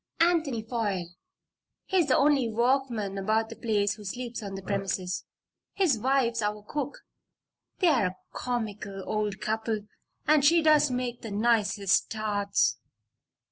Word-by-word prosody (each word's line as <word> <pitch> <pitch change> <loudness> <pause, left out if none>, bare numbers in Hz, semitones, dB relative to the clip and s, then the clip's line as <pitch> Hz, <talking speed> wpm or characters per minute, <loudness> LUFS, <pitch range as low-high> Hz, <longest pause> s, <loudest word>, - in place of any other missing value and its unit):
"Anthony 320 -9 +2
Foyle. 205 -7 -2 0.8
He's 365 -5 +2
the 260 - +4
only 275 -4 +3
workman 235 -4 0
about 220 +3 +1
the 230 - -8
place 205 -4 0
who 210 - -12
sleeps 240 +4 -5
on 200 -2 -6
the 195 - -7
premises. 190 -2 -2 0.5
His 325 - +2
wife's 245 -2 +1
our 210 0 -2
cook. 285 +5 -5 0.7
They're 300 - +3
a 185 +1 -7 0.2
comical 210 -5 -4
old 210 -2 -2
couple 220 0 -1 0.5
and 300 -1 +5
she 330 +3 +5
does 305 -2 +5
make 250 -1 -3
the 225 - -6
nicest 205 -2 +2
tarts! 200 - 0
225 Hz, 135 wpm, -28 LUFS, 205-260 Hz, 0.8 s, and